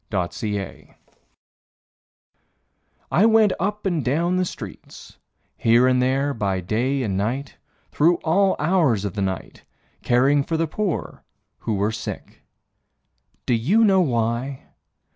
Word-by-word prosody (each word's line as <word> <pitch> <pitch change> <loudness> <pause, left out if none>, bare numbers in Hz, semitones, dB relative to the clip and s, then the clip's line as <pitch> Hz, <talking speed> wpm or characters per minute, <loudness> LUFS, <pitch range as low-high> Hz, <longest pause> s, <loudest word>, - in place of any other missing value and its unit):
Doc 90 -4 -2
Hill 105 -3 -5 2.2
I 200 +7 +4
went 220 -3 +4
up 210 +3 -2
and 170 -6 0
down 165 +8 0
the 185 - +1
streets - - -10 0.4
Here 120 +2 +4
and 125 0 +3
there 135 +3 +1
by 100 -5 -1
day 125 +9 -1
and 100 -5 -2
night, 120 +8 -3 0.3
Through 165 +4 +3
all 190 +4 +2
hours 150 - +1
of 100 - -3
the 105 - -3
night 95 -1 -4 0.4
caring 135 +4 +3
for 165 +3 -2
the 165 - +1
poor 190 +3 -4 0.4
who 110 - -2
were 100 +2 0
sick. 110 - -7 1.0
Do - - +1
you 160 - +3
know 195 -3 +4
why? 120 -1 -1
135 Hz, 130 wpm, -22 LUFS, 110-170 Hz, 2.2 s, I